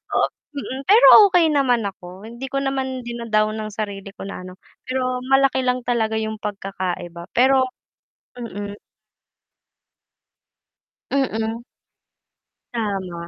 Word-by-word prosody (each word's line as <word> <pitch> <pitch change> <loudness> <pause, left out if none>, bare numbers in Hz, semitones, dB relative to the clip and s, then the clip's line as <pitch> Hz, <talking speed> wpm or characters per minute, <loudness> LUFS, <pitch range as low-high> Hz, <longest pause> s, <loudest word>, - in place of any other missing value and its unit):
Oo, - - +3 0.3
mm, 265 -1 -4
pero 435 +5 +7 0.3
okey 345 -3 +5
naman 250 -6 +2
ako, 190 +2 -11
hindi 235 +3 -7
ko 275 - 0
naman 265 -1 -2
dina-down 220 -3 0
ang 215 0 -5
sarili 200 -2 -5
ko - - -8
na 185 - -7
ano, 185 +1 -11 0.2
pero 255 -1 -1
malaki 270 0 +3
lang 250 0 +1
talaga 220 -2 +1
yung 220 0 -3
pagkakaiba 185 -4 -5
pero 260 +2 +4 0.7
Mm. 205 -4 -6 2.3
Mm. 225 -4 -1 1.1
Tama. 190 -7 -3
225 Hz, 115 wpm, -22 LUFS, 200-260 Hz, 2.3 s, pero